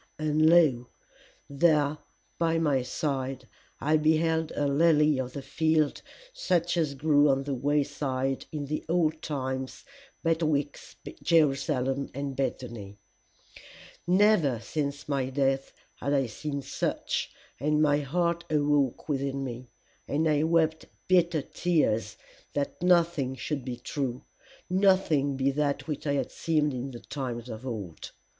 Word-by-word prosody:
And 155 +1 +3
lo! 145 -8 +4 0.6
there 150 0 +2 0.4
by 165 -1 +2
my 145 -5 +2
side 130 -1 -3 0.3
I 155 +2 +2
beheld 160 +1 +2
a 145 - 0
lily 150 0 +4
of 130 -1 -4
the 140 - -6
field 155 +1 +1 0.3
such 175 - 0
as 155 -5 0
grew 145 +1 +4
on 135 0 +2
the 140 0 -3
wayside 135 -1 -1
in 150 -2 -4
the 150 +2 -3
old 160 -2 +1
times 130 -3 -4 0.4
betwixt 155 -3 -1 0.2
Jerusalem 140 -4 +1
and 140 -1 -4
Bethany. 120 -6 -4 1.1
Never 180 - +4
since 140 +3 -4
my 135 -3 -1
death 135 0 0 0.3
had 140 - -1
I 135 -1 +2
seen 140 +4 -5
such, - - -2 0.3
and 150 +3 +1
my 145 -1 +3
heart 170 +4 0
awoke 145 -3 +1
within 140 -2 -1
me, 125 -1 -6 0.4
and 155 +3 +1
I 150 -1 +2
wept 160 0 +1 0.2
bitter 175 -5 +3
tears 150 -13 0 0.4
that 145 +2 -3
nothing 170 -7 +2
should 135 +2 -4
be 125 -1 -5
true, 130 -1 -4 0.4
nothing 180 -8 +2
be 135 +1 +2
that 145 +1 -1
which 150 -1 -4
it 140 - +1
had 140 - -2
seemed 155 -3 0
in 130 +2 -4
the 120 -3 -9
times 125 -4 -5
of 110 +3 -7
old. 100 -9 -6
145 Hz, 135 wpm, -28 LUFS, 135-160 Hz, 1.1 s, lo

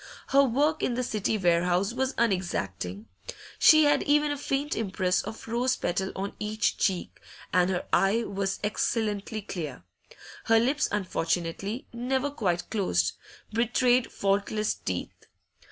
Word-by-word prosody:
Her 275 +1 +6
work 285 +5 +1
in 245 - 0
the 255 - -1
City 215 -2 -1
warehouse 180 +2 +2
was 265 +1 -1
unexacting; 105 - -1 0.5
she 310 -1 +7
had 290 -1 +4
even 295 0 +2
a - - -1
faint 280 +2 -1
impress 190 -4 0
of 225 - -8
rose 245 +3 +1
petal 190 -1 -2
on 195 +1 -4
each 215 +1 -1
cheek, 190 -4 -1 0.3
and 180 0 +4
her 180 -1 -1
eye 210 +4 +3
was 195 -2 -2
excellently 210 0 -1
clear. 155 - -6 0.6
Her 225 0 +5
lips, 270 +6 +1
unfortunately 185 +2 -2
never 260 +4 -1
quite 180 -10 -1
closed, 90 - +1 0.4
betrayed 240 +2 +2
faultless 200 +2 0
teeth. 90 -2 -4
210 Hz, 135 wpm, -27 LUFS, 185-250 Hz, 0.6 s, she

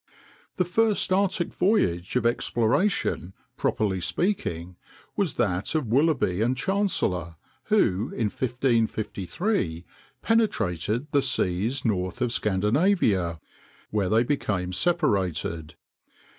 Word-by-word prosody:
The 180 - +1
first 210 +1 +1
Arctic 190 -2 0
voyage 95 - +1
of 125 -2 +1
exploration, 120 - 0 0.2
properly 95 -4 0
speaking, 90 - -2 0.4
was 195 -8 0
that 100 - -1
of 155 -4 +1
Willoughby 130 - +2
and 125 +3 +1
Chancellor, 125 - -1 0.3
who 95 +4 +2
in 110 -3 -1
1553 115 - -1 0.4
penetrated 115 - 0
the 145 -2 +3
seas 115 0 0
north 95 -1 -1
of 125 -2 0
Scandinavia, 105 - +1 0.5
where 100 -3 0
they 110 +3 +4
became 100 -9 -1
separated. 90 - 0
115 Hz, 100 wpm, -26 LUFS, -, 0.5 s, they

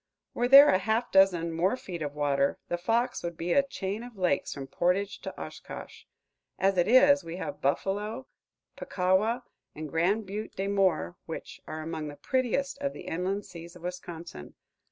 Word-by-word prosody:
Were 245 - +1
there 275 +3 +10
a 185 - +4
half 220 +5 0
dozen 180 -4 +4
more 180 +8 +1
feet 175 -8 -7
of 145 -1 -4
water, 140 -1 +1
the 175 - 0
Fox 230 +7 0
would 170 -1 -5
be 170 +1 -1
a 280 - +6
chain 215 -6 -4
of 240 -3 -11
lakes 180 -7 0
from 140 - -5
Portage 185 +7 0
to - - -7
Oshkosh. - - -9 0.5
As 195 0 +2
it 175 -1 +2
is, 280 +4 +6
we 165 - -6
have - - -6
Buffalo, 205 - -1 0.5
Puckawa, 200 +7 +1 0.3
and 155 0 -5
Grand 180 +8 +1
Butte 205 +3 -6
des 195 +1 -2
Morts, 185 - +1
which - - -7
are 155 0 -5
among 160 -1 -4
the 145 - -7
prettiest 260 - -1
of 280 -1 -2
the - - -9
inland 190 +4 -2
seas 170 +1 -11
of 175 - -14
Wisconsin. 175 - -7
190 Hz, 175 wpm, -28 LUFS, 165-220 Hz, 0.5 s, there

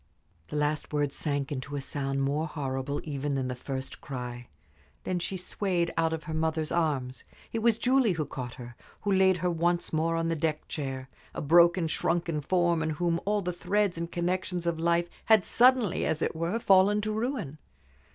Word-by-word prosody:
The - - -7
last 150 0 -1
word 145 -2 0
sank 145 -2 -2
into 140 +1 -4
a - - -1
sound 135 0 -2
more 145 +4 0
horrible 140 -2 -3
even 145 -1 -2
than 130 -1 -1
the 125 - -3
first 130 +1 -6
cry. 125 -4 -6 0.6
Then 180 -1 -1
she 190 +2 -3
swayed 180 -2 -1
out 165 0 +2
of 160 0 -3
her 160 0 -6
mother's 160 -1 -1
arms. 140 -7 -1 0.3
It 230 - 0
was 225 -1 +3
Julie 250 -3 +3
who 160 -3 -2
caught 125 -3 -6
her, 120 -1 -10 0.3
who 205 - -1
laid 190 -1 +4
her 180 - +3
once 175 +1 0
more 165 +1 +1
on 165 0 0
the 165 - 0
deck 155 0 -2
chair 135 -3 -4 0.3
a - - -3
broken, 170 +3 +5
shrunken 165 -1 0
form, 175 +1 +2
in 160 - 0
whom 170 +2 0
all 205 -1 +1
the 180 0 -2
threads 195 +2 0
and 170 0 -4
connections 180 0 -1
of 170 -1 0
life 170 +1 +2 0.2
had 220 -4 +5
suddenly, 245 -5 +4
as 160 0 0
it - - -1
were, 170 +6 -1
fallen 200 0 +5
to 215 +1 -2
ruin. 220 - -3
165 Hz, 190 wpm, -29 LUFS, 145-180 Hz, 0.6 s, broken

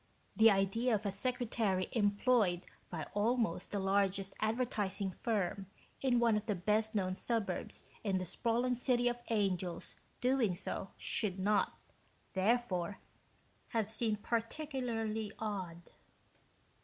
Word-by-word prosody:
The 220 +3 +8
idea 215 +4 +2
of 210 0 -3
a 200 - +1
secretary 215 -3 0
employed 205 -3 +2 0.2
by 160 -4 -4
almost 220 -4 +1
the 205 - -2
largest 195 0 +1
advertising 215 -4 0
firm 195 -3 0 0.3
in 250 -3 +3
one 230 -2 +4
of 210 +1 -2
the 210 - +1
best 215 +4 +1
known 185 -2 +1
suburbs 205 -2 -1 0.2
in 195 -3 +1
the 185 - -2
sprawling 240 +6 +1
City 245 0 +2
of 240 0 +1
the - - -1
Angels 185 -4 -1 0.2
doing 250 -7 +2
so 190 +2 -4
should 200 -4 -1
not, 205 +2 +2 0.6
therefore, 195 -3 +1 0.7
have 220 -2 -1
seemed 215 -2 0
particularly 230 -4 -2
odd. 185 -6 -4
210 Hz, 125 wpm, -35 LUFS, 195-235 Hz, 0.7 s, The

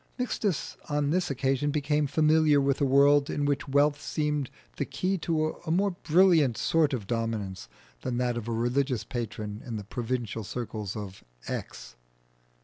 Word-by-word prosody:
Mixtus 215 - -2
on 145 -1 +1
this 180 +1 +1
occasion 135 +1 0
became 150 0 +1
familiar 155 0 +4
with 140 0 +1
a - - +4
world 140 +1 +5
in 145 - -1
which 145 0 0
wealth 145 +1 +2
seemed 150 -4 -1 0.3
the - - 0
key 190 +1 -1
to 155 -1 0
a 165 - -6
more 195 +5 +2
brilliant 165 - +3
sort 160 -3 +2
of 120 -7 -3
dominance 105 - -3 0.3
than 125 -1 -2
that 125 -1 0
of 120 -1 -5
a - - -2
religious 120 +2 0
patron 105 -3 -5
in 120 - -5
the 105 - -6
provincial 115 0 -3
circles 110 -2 -5
of 100 -3 -7 0.2
X. - - -6
140 Hz, 160 wpm, -28 LUFS, 115-150 Hz, 0.3 s, world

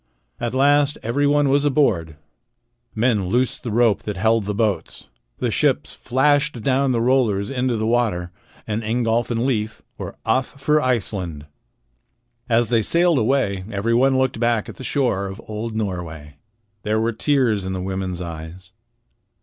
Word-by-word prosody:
At 120 +1 -3
last 145 +2 +3
everyone 145 +4 +2
was 140 +1 +3
aboard. 115 - +1 0.8
Men 110 -4 +1
loosed 125 +6 0
the 120 - -5
rope 115 -1 +2
that 105 -2 -5
held 110 +1 +2
the 105 0 -2
boats. 105 -3 -2 0.3
The - - -1
ships - - +1
flashed 145 -1 +1
down 135 +1 +2
the 120 - +1
rollers 115 -5 +1
into 125 -2 0
the 110 - -1
water, 110 -7 0 0.3
and 110 +1 -2
Ingolf 115 +1 0
and 120 0 0
Leif 110 -5 -2 0.2
were - - -6
off 130 +4 0
for 150 +2 +2
Iceland. 95 - -2 1.0
As 115 +1 +2
they 115 -2 +3
sailed 170 - +3
away 110 -6 +1
everyone 115 +6 +2
looked 130 -3 0
back 115 -2 +1
at - - -10
the - - -8
shore 120 -9 0
of 95 +2 -8
old 110 +1 -5
Norway. 85 -8 -5 0.4
There 110 +1 0
were 115 +1 0
tears 115 -6 +1
in 95 - -3
the 95 - -3
women's 95 -1 -3
eyes. 85 +2 -8
115 Hz, 155 wpm, -21 LUFS, 100-130 Hz, 1.0 s, last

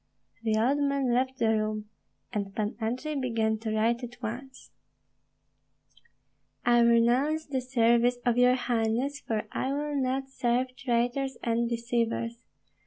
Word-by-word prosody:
The 220 -1 +1
old 260 +6 +2
man 280 -3 +1
left 260 +1 0
the 225 -4 +2
room, 215 -1 -1 0.5
and 200 -2 -3
Pan 215 0 -2
Andrei 250 +7 -2
began 230 -5 0
to 225 0 -4
write 230 +3 +1
at 240 0 -8
once: 250 +3 -7 1.9
I 240 0 +5
renounce 240 +7 +3
the 265 -3 -2
service 240 -1 +3
of 240 -1 +3
your 250 +1 +5
highness, 245 +3 0
for 220 -5 -2
I 260 - -1
will 295 +1 -2
not 265 0 0
serve 255 -1 -1
traitors 245 +2 -1
and 235 0 +1
deceivers. 235 0 -2
240 Hz, 135 wpm, -28 LUFS, 230-260 Hz, 1.9 s, I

